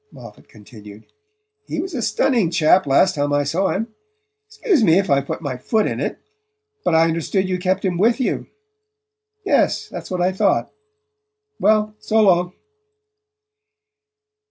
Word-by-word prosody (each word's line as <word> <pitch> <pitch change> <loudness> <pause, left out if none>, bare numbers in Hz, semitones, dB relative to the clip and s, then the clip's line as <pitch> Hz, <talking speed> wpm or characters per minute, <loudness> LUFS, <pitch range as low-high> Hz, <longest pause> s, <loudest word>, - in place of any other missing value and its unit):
Moffatt - - -14
continued. 105 -1 -15 0.6
"He - - -4
was 370 +2 -5
a 255 - -3
stunning 220 -2 +1
chap 170 0 +3
last 140 +7 +3
time 145 0 -2
I 145 0 +1
saw 170 +7 -1
him. 220 +3 -3 0.5
Excuse 430 - 0
me 170 -3 +4
if 195 -5 0
I've 140 0 +1
put - - -5
my 135 -4 -4
foot 215 - 0
in - - -3
it; - - -3 0.7
but 165 - +1
I 160 - +5
understood 165 +4 -1
you 185 -1 -2
kept 185 +2 -1
him 175 -2 -1
with 230 +5 +2
you...? 255 - -2 1.0
Yes: - - +1
that's - - -8
what 185 - -3
I 180 +1 +1
thought.... 190 - 0 0.9
Well, 215 0 +2
so 220 - 0
long." 180 -3 +3
185 Hz, 155 wpm, -20 LUFS, 155-215 Hz, 1.0 s, I